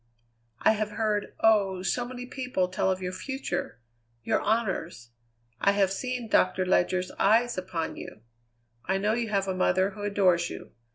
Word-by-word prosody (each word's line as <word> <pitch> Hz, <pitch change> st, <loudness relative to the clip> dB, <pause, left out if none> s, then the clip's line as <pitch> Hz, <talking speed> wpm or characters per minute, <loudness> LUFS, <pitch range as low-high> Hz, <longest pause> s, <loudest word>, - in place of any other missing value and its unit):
I -, -, +5 dB
have 215 Hz, -1 st, -2 dB
heard, 210 Hz, -2 st, -1 dB
oh! 200 Hz, -4 st, +3 dB
so 240 Hz, +5 st, -1 dB
many 250 Hz, 0 st, -7 dB
people, 250 Hz, -8 st, -2 dB
tell 185 Hz, -, 0 dB
of 185 Hz, 0 st, -1 dB
your 180 Hz, -, -2 dB
future, 265 Hz, -, -4 dB, 0.4 s
your -, -, +1 dB
honours. 190 Hz, -, -1 dB, 0.5 s
I 200 Hz, -, +3 dB
have 195 Hz, -2 st, +2 dB
seen 250 Hz, +4 st, -3 dB
Doctor 185 Hz, -2 st, +2 dB
Ledyard's 180 Hz, 0 st, +1 dB
eyes 230 Hz, +4 st, +3 dB
upon 180 Hz, -3 st, -4 dB
you; 110 Hz, -, -9 dB, 0.6 s
I 190 Hz, +1 st, +1 dB
know 210 Hz, +3 st, +1 dB
you 235 Hz, -1 st, -1 dB
have 195 Hz, -2 st, 0 dB
a 190 Hz, -, 0 dB
mother 185 Hz, +1 st, +2 dB
who 205 Hz, -, -10 dB
adores 185 Hz, -4 st, +2 dB
you. -, -, -9 dB
195 Hz, 165 wpm, -27 LUFS, 185-225 Hz, 0.6 s, I